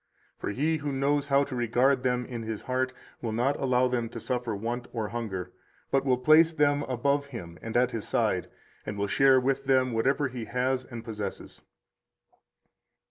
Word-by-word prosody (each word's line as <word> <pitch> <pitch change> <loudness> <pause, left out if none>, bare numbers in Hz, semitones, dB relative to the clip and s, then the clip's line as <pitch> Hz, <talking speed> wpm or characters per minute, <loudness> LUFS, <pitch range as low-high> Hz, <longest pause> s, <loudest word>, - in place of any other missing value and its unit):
For - - -3
he 150 +10 0
who 145 -1 -3
knows 140 +1 +1
how 140 0 +4
to 140 -2 -5
regard 125 +3 +2
them 125 -1 0
in 120 -2 -6
his 110 -1 -5
heart 130 0 0 0.3
will 115 - -2
not 125 +5 +1
allow 130 -1 +3
them 120 -2 -1
to 115 - -7
suffer 120 -1 -2
want 120 +4 -4
or 110 -3 -3
hunger, 105 -6 -4 0.4
but 135 0 +3
will 130 -2 +3
place 155 +5 +6
them 145 -2 +2
above 140 +3 +1
him 90 -11 -8
and 115 +1 -2
at 125 0 +3
his 115 -3 -4
side, - - 0 0.3
and 105 - -5
will 100 - 0
share 135 +5 +5
with 135 +1 0
them 130 -2 +3
whatever 135 +5 +1
he 125 -3 -6
has 130 +2 -1
and 120 -3 -8
possesses. 105 -3 -6
125 Hz, 185 wpm, -28 LUFS, 115-135 Hz, 0.4 s, place